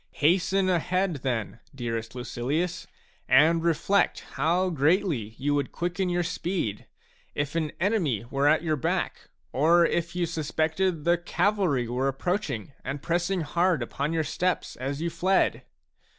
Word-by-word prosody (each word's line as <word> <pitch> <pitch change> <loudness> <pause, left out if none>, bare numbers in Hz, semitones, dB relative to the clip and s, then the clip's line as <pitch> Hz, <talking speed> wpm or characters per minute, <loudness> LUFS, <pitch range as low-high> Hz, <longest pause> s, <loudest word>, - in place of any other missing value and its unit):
Hasten 185 +5 +2
ahead, 180 -1 +1
then, 120 -4 -3 0.2
dearest 115 -2 -4
Lucilius, 140 +8 -2 0.4
and 160 +5 +5
reflect 170 +4 +2
how 175 +6 +1
greatly 150 - +1
you 145 +3 0
would 140 -2 -1
quicken 180 +2 -2
your 175 0 +1
speed 165 - -3 0.5
if 145 0 -2
an 160 -3 -1
enemy 170 - +1
were 140 +1 +2
at 155 +2 +4
your 155 -2 +1
back, 130 - -2 0.2
or 165 +5 +4
if 170 +1 -1
you 180 -1 +1
suspected 160 +1 -1
the 170 +1 +3
cavalry 175 - +1
were 125 +3 -1
approaching 140 - -2
and 140 +1 -5
pressing 175 +2 0
hard 170 -1 +1
upon 140 +5 -3
your 165 -1 +1
steps 180 +4 -1
as 140 +4 -4
you 170 - -1
fled. 185 +4 +1
165 Hz, 140 wpm, -27 LUFS, 140-180 Hz, 0.5 s, and